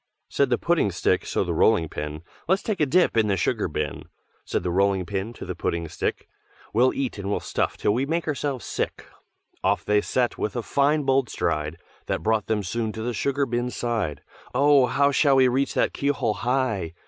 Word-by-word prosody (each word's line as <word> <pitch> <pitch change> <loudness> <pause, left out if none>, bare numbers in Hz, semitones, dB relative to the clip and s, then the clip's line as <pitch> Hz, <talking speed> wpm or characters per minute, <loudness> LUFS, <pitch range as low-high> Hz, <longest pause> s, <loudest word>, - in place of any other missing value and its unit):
_ - - -18
Said 140 -2 +2
the 120 - +2
Pudding 170 -11 +2
stick 90 +1 0
so - - 0
the 90 -2 -2
Rolling 85 0 +3
pin, 75 +1 -6 0.2
"Let's 190 +3 +2
take 215 -3 -2
a 150 - +3
dip 175 +2 +3
in 110 -2 +3
the 100 -2 +1
sugar 85 - 0
bin!" - - -4 0.4
Said - - -2
the 90 - -1
Rolling 95 0 +2
pin 100 +3 -3
to - - -8
the 90 - -4
Pudding 85 -1 -2
stick, - - -3 0.5
"We'll 125 +4 +4
eat 130 -6 -3
and 100 0 -4
we'll 100 - 0
stuff - - -2
till 105 - +1
we 130 +5 0
make 165 +1 -1
ourselves 140 -3 -2
sick." - - -3 0.6
Off - - +1
they 105 0 +3
set 125 +2 -1
with 105 - -2
a 120 - -2
fine 145 +4 +2
bold 135 -3 +2
stride, 75 +1 -2 0.3
That - - -2
brought 110 -1 +1
them 105 -2 0
soon 110 +4 -2
to 110 - -5
the 120 +1 -2
sugar 140 +4 0
bin's 120 0 -2
side. 110 - -2 0.3
"Oh! 140 -1 +5
how 140 +2 +3
shall 140 0 +4
we 130 -1 +6
reach 130 +3 0
that - - +1
keyhole 140 -6 0
high? 120 -9 -1
120 Hz, 210 wpm, -25 LUFS, 100-140 Hz, 0.6 s, we